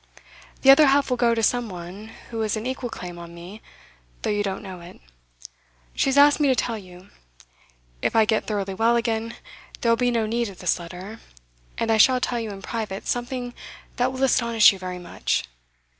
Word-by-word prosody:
The 270 - +9
other 290 +2 +7
half 275 0 +3
will 250 - +1
go 235 -1 +3
to 225 - -1
some 240 +1 +1
one 180 +3 -9 0.2
who 225 -1 -3
has 215 0 -1
an 215 - -5
equal 255 -1 -3
claim 175 -5 -8
on 170 0 -10
me, 180 +6 -11 0.6
though - - 0
you 205 0 0
don't 195 0 -3
know 190 -2 -8
it. 170 0 -13 0.9
She - - 0
has 270 - +1
asked 290 +1 +6
me 295 - +3
to 260 - +3
tell 230 0 -1
you. 185 -2 -12 0.9
If - - -1
I 220 -1 +5
get 220 0 0
thoroughly 200 -2 -2
well 225 +4 +2
again, 230 -1 -1 0.5
there 235 - +3
will - - +5
be 245 +1 +2
no 230 -2 0
need 230 +1 -1
of 190 - -12
this 180 0 0
letter, 180 +6 -9 0.6
and 225 - 0
I 220 - +3
shall 255 +3 +5
tell 245 -1 -1
you 225 -1 -4
in 195 -1 -9
private 215 -4 -4
something 245 0 -3 0.4
that 250 +1 +1
will 260 +1 -3
astonish 235 -5 +5
you 195 - -10
very 185 -1 -5
much. 175 -1 -2
225 Hz, 205 wpm, -24 LUFS, 195-245 Hz, 0.9 s, The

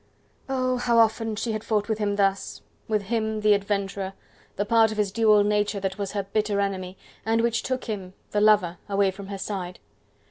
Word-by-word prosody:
Oh! 255 -1 0
how 240 -1 +1
often 225 -1 +3
she 225 +2 -2
had 215 0 -3
fought 210 -2 0
with 220 -1 -1
him 205 -1 0
thus: 195 -1 0 0.2
with 215 -2 0
him, 220 0 -1
the 210 0 +5
adventurer, 200 -1 -2 0.4
the 205 - -1
part 225 0 +4
of 215 - -5
his 205 -2 +1
dual 215 -1 +4
nature 210 0 +1
that 195 +1 -3
was 200 -1 -3
her 200 -1 -1
bitter 205 +1 -1
enemy, 190 -2 -2 0.3
and 225 +1 +2
which 235 0 +1
took 260 -1 -3
him, 195 -4 -5 0.2
the 205 - +1
lover, 205 -5 +4
away 200 -1 +2
from 195 +1 -10
her 200 0 -5
side. 185 -2 -5
210 Hz, 200 wpm, -25 LUFS, 195-220 Hz, 0.4 s, the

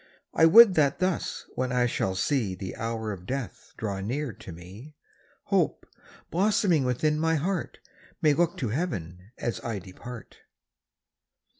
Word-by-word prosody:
I 160 - +6
would 215 +3 +9
that 145 -5 +2
thus, 185 -2 -2
when 130 0 -2
I 125 -1 +2
shall 95 -5 -1
see 105 -2 0
The 95 +1 -6
hour 115 -1 -3
of 90 -2 -8
death 135 -3 -5
draw 100 -3 -3
near 125 +6 -3
to 95 - -11
me, 95 - -12 0.5
Hope, - - 0 0.5
blossoming 185 -5 +2
within 150 +5 +1
my 160 0 +2
heart, 175 +3 -2 0.4
May 150 -1 +4
look 170 +3 +1
to 125 - -2
heaven 95 - -4
as 120 - -3
I 115 -3 -3
depart. 100 +6 -10
125 Hz, 145 wpm, -27 LUFS, 100-160 Hz, 0.5 s, would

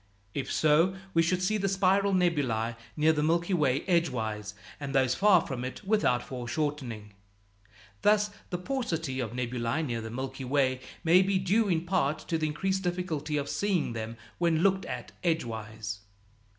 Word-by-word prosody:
If 140 - -3
so, 160 +5 +3 0.2
we 165 - +5
should 180 +2 +1
see 215 +3 +2
the 195 0 0
spiral 195 +1 +3
nebulæ 140 - +1 0.2
near 155 +1 +4
the 150 - 0
Milky 170 +4 +1
Way 145 -5 +2
edgewise, 110 - 0 0.2
and 140 -2 -4
those 130 -2 +3
far 190 +2 +5
from 125 -3 -4
it 130 +10 -6
without 195 - +2
foreshortening. 125 -4 -4 0.9
Thus, 210 0 +3 0.2
the 180 - -2
paucity 170 - -2
of 120 -3 -3
nebulæ 125 +4 -1
near 120 -4 -2
the 110 - -6
Milky 130 +3 -5
Way 130 -1 +1 0.2
may 175 +2 +6
be 190 0 +2
due 200 +4 +2
in 170 -1 +1
part 165 -5 +1
to 165 -2 +1
the 155 - +1
increased 190 +6 -1
difficulty 170 -5 -2
of 140 -1 -2
seeing 190 - 0
them 115 0 -5 0.2
when 170 -1 +2
looked 195 -1 +3
at 125 -2 -6
edgewise. 110 - -2
155 Hz, 165 wpm, -29 LUFS, 125-185 Hz, 0.9 s, may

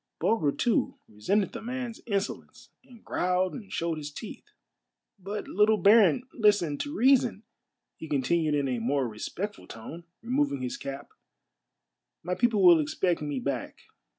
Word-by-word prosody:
Bulger, 160 -11 +1
too, 235 - 0
resented 185 - 0
the - - -6
man's 245 -1 -5
insolence, 200 -3 -4
and 240 -3 -18
growled 180 +1 0
and 210 -6 -9
showed 165 -2 -2
his 150 -1 -6
teeth. 210 +8 -9 0.4
" 215 - -52
But, 210 0 -4
little 210 +2 +3
baron, 210 +5 +5
listen 205 - +2
to 290 +1 -4
reason," 245 -4 +3 0.5
he 160 - -8
continued 150 +2 +1
in 140 -1 0
a 125 -2 -1
more 130 +3 0
respectful 180 - -6
tone, 150 +10 -9 0.2
removing 250 - 0
his 125 - -3
cap; 140 +1 -7 0.6
" - - -59
my 180 +2 -2
people 220 -1 +2
will 170 -2 +8
expect 165 +4 0
me 145 -3 -3
back. 130 -1 -4
180 Hz, 150 wpm, -28 LUFS, 145-220 Hz, 0.6 s, will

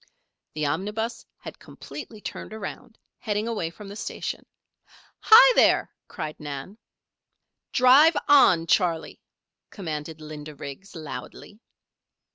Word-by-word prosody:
The 155 -1 -1
omnibus 210 +9 -3
had - - -11
completely 225 -7 -10
turned - - -7
around, 220 +1 -8 0.2
heading 210 +1 -2
away 215 -8 -2
from 200 +4 -12
the 200 - -9
station. - - -5 0.7
"Hi, - - +8
there!" - - +3 0.2
cried 155 - -7
Nan. 145 +8 -8 0.9
"Drive 275 +6 +6
on, 245 - +6
Charley," 170 -2 0 0.5
commanded 160 -4 -6
Linda 155 -1 -9
Riggs, 140 +9 -10
loudly. 155 - -9
195 Hz, 105 wpm, -25 LUFS, 155-225 Hz, 0.9 s, Hi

